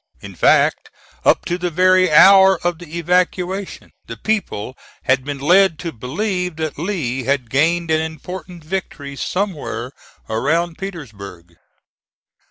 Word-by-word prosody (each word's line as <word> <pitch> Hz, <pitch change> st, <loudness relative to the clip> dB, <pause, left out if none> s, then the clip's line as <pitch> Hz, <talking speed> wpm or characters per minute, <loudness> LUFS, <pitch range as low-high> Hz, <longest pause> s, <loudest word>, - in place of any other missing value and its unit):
In -, -, -10 dB
fact, -, -, +2 dB, 0.3 s
up -, -, +3 dB
to 175 Hz, +1 st, -2 dB
the 180 Hz, 0 st, -1 dB
very 185 Hz, +2 st, +3 dB
hour 190 Hz, +3 st, +7 dB
of 175 Hz, -2 st, 0 dB
the 170 Hz, -1 st, -8 dB
evacuation 180 Hz, +2 st, -1 dB, 0.2 s
the 115 Hz, -, -7 dB
people 130 Hz, -, -2 dB, 0.3 s
had 130 Hz, 0 st, +2 dB
been 145 Hz, +1 st, -5 dB
led 175 Hz, +4 st, +4 dB
to 165 Hz, +1 st, -5 dB
believe 180 Hz, -, -3 dB
that 155 Hz, -2 st, -4 dB
Lee 145 Hz, -, -2 dB
had 130 Hz, -4 st, -1 dB
gained 165 Hz, +4 st, +1 dB
an 155 Hz, 0 st, +2 dB
important 170 Hz, +2 st, -7 dB
victory 155 Hz, -5 st, -5 dB
somewhere 155 Hz, -, -3 dB, 0.4 s
around 160 Hz, +9 st, -1 dB
Petersburg. 100 Hz, -, -9 dB
165 Hz, 130 wpm, -19 LUFS, 140-185 Hz, 0.4 s, hour